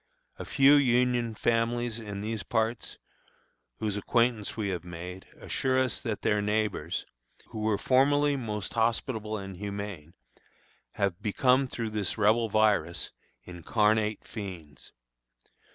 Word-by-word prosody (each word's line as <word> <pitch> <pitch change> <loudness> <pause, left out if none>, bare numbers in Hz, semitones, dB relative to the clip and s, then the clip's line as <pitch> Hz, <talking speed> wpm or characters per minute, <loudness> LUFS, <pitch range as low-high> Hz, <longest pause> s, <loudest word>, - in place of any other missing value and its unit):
A - - -5
few 140 0 +6
Union 125 -3 +2
families 115 +1 0
in 105 -3 -6
these 110 0 -3
parts, 115 +2 -1 0.8
whose 105 -2 -2
acquaintance 115 0 +1
we 105 -3 -1
have 90 -2 -3
made, 90 +2 -8
assure 130 -1 0
us 130 -2 0
that 110 -3 -4
their 105 0 +2
neighbors, 105 -6 -1 0.4
who 110 - -7
were 110 -1 +1
formerly 145 +4 +3
most 105 -6 -4
hospitable 110 -1 0
and 95 -2 -7
humane, 100 -5 -6 0.8
have 100 -1 -1
become, 125 +6 +3
through 115 -3 -4
this 105 -1 -1
Rebel 110 +2 +3
virus, 100 -7 +2 0.3
incarnate 105 +5 0
fiends. 85 - -8
110 Hz, 120 wpm, -29 LUFS, 100-120 Hz, 0.8 s, few